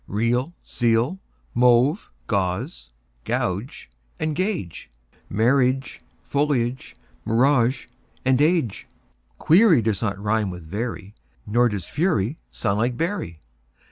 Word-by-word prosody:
Real, 120 - 0
zeal; 120 +9 +1 0.3
mauve, 125 - +3 0.2
gauze 100 - -2 0.4
and 90 - -4
gauge; 175 - -3 0.4
Marriage, 130 +4 +1 0.2
foliage, 130 -3 -1 0.3
mirage, 125 +2 +2 0.4
age. 135 - +2 0.5
Query 175 - +5
does 105 -3 -1
not 100 -4 -1
rime 105 0 0
with 90 -2 -8
very, 105 +3 -5 0.3
Nor 120 +3 +3
does 100 -5 -4
fury 150 - 0
sound 100 -2 -1
like 120 +2 0
bury. 165 - -3
120 Hz, 95 wpm, -23 LUFS, 105-145 Hz, 0.5 s, Query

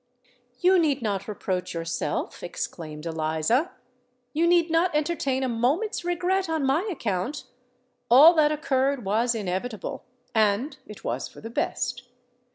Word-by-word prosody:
"You 370 +1 +5
need 285 -6 +1
not 200 -3 -2
reproach 185 -4 -3
yourself," 165 0 -3
exclaimed 155 -3 -6
Eliza: 160 - 0 0.6
"you 330 +3 +2
need 340 -1 +3
not 330 0 +2
entertain 290 -4 0
a - - +1
moment's 270 - 0
regret 355 +1 0
on 320 -3 0
my 315 +11 +1
account! 235 - -2 0.7
All 285 +8 +9
that 305 -2 +4
occurred 275 -4 0
was 230 +4 +1
inevitable—and 215 - -2
it 210 - -11
was - - -2
for - - -14
the 225 - -8
best. 245 +1 -2
250 Hz, 130 wpm, -26 LUFS, 205-320 Hz, 0.7 s, All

